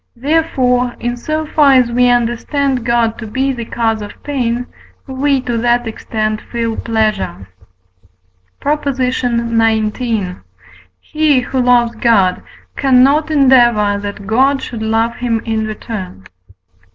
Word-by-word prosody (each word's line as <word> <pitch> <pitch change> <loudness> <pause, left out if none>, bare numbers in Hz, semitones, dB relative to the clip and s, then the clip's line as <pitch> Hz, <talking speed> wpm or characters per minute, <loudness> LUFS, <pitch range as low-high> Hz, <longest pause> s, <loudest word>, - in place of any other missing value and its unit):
therefore, 250 -3 0
in 240 0 -2
so 310 +6 -3
far 295 -2 +4
as 250 -2 +3
we 245 +1 +3
understand 245 +2 0
God 235 -1 0
to 225 - -6
be 265 +5 -1
the 235 -2 -6
cause 225 -1 -1
of 205 - -10
pain, 245 -4 -2 0.4
we 275 +1 0
to 240 -2 -3
that 240 +1 +1
extent 215 -1 -3
feel 230 -2 -2
pleasure. 215 - -2 1.1
PROP. 300 +1 -1
XIX. 235 -4 0 1.1
He, 305 -4 +1
who 255 +1 -2
loves 240 -1 +3
God, 200 -6 +2 0.3
cannot 275 +3 +3
endeavour 240 -8 +4
that 205 0 -6
God 265 +6 +2
should 230 -3 -6
love 225 +1 0
him 235 -2 -1
in 220 -1 -1
return. 205 - -7
240 Hz, 125 wpm, -15 LUFS, 225-265 Hz, 1.1 s, far